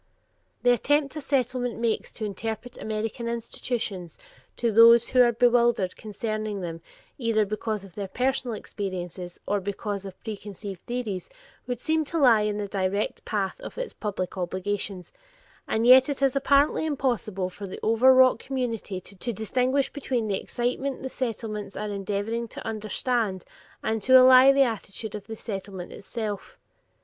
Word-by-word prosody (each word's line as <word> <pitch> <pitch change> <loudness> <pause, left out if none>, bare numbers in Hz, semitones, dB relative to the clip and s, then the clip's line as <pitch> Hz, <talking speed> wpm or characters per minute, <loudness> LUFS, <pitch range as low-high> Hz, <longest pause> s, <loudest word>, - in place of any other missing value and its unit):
The 245 - +6
attempt 280 +4 +1
a 305 - -4
Settlement 255 -3 0
makes 230 -1 -1
to 220 - -4
interpret 225 +4 -5
American 220 +2 -3
institutions 230 -5 -4 0.4
to 235 -1 +1
those 230 +2 +7
who 255 - +5
are 240 -1 +6
bewildered 235 -5 +3
concerning 215 -1 -4
them 165 -2 -5 0.4
either 225 -3 +2
because 215 0 -3
of 195 -3 -13
their 200 +1 -4
personal 255 +2 -1
experiences, 180 -4 -6
or 205 -1 0
because 200 +1 -4
of 195 -1 -9
preconceived 205 -3 -7
theories, 240 -6 -3 0.4
would 245 -2 -3
seem 315 +3 +1
to 330 - -3
lie 245 -8 +6
in 210 0 -1
the 205 -1 -3
direct 195 +1 -2
path 195 -3 -2
of - - -9
its - - -4
public 190 -3 -4
obligation, 185 +1 -3 0.6
and 220 +1 0
yet 260 +2 +8
it 275 -1 -2
is 270 -1 +3
apparently 280 +2 +3
impossible 240 -11 -1
for 200 +2 -8
the 185 - -7
overwrought 255 +2 +6
community 230 -8 -3
to 200 +6 -5
distinguish 255 +6 0
between 255 -5 -2
the 195 -2 -1
excitement 250 +3 -2
the 265 - -3
Settlements 220 -5 -4
are 210 0 -3
endeavoring 205 +4 -2
to - - -9
understand 215 -2 -1 0.4
and 220 0 -1
to 260 +5 +7
allay 255 +1 +8
and 275 - +5
the 275 - +7
attitude 220 -3 -4
of 210 -1 -7
the 225 - -6
Settlement 195 -4 -6
itself. 210 -1 -5
220 Hz, 155 wpm, -26 LUFS, 200-250 Hz, 0.6 s, yet